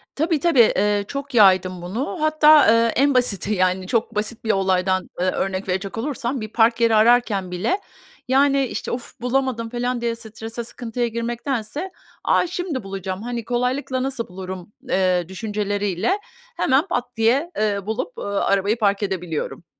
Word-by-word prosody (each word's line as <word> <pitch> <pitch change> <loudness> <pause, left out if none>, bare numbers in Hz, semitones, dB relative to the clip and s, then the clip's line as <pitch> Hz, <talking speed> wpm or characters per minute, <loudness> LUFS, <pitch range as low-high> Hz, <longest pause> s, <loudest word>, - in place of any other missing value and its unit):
Tabii 315 0 +1
tabii, 330 -5 +3 0.2
eee, 205 +1 +2
çok 280 -1 -6
yaydım 185 -4 +4
bunu. 225 - -3
Hatta, 310 -1 +6
eee, 230 0 +4
en 280 +2 +3
basiti, 215 -5 0
yani 185 0 +1
çok 230 +2 -1
basit 215 +2 -3
bir 220 - +2
olaydan, 185 -1 +1
eee, 180 - +1
örnek 190 0 -3
verecek 190 +4 -2
olursam 255 0 -3
bir 215 - -5
park 230 0 +3
yeri 230 -1 +4
ararken 215 -4 +3
bile, 215 - -1 0.5
yani, 275 +1 +3
işte, - - -5
of! 240 -2 -6
Bulamadım. 250 -2 -1
Falan 245 0 -2
diye 235 -1 -1
strese 225 +1 -7
sıkıntıya 240 +1 -3
girmektense, 235 - -3 0.3
a - - +3
şimdi 350 -6 -3
bulacağım, 195 0 -5
hani, 240 -1 -4
kolaylıkla 255 +2 -1
nasıl 260 -3 -3
bulurum, 185 +1 -8 0.2
eee, 185 -2 +1
düşünceleriyle 205 - -1 0.4
hemen 280 +6 +2
pat 245 -7 -3
diye, 255 +9 +2
eee, 210 -2 +1
bulup, 220 - -3
eee, - - -5
arabayı 200 +1 +1
park 200 -2 +1
edebiliyorum. 180 -4 -3
225 Hz, 155 wpm, -22 LUFS, 195-255 Hz, 0.5 s, Hatta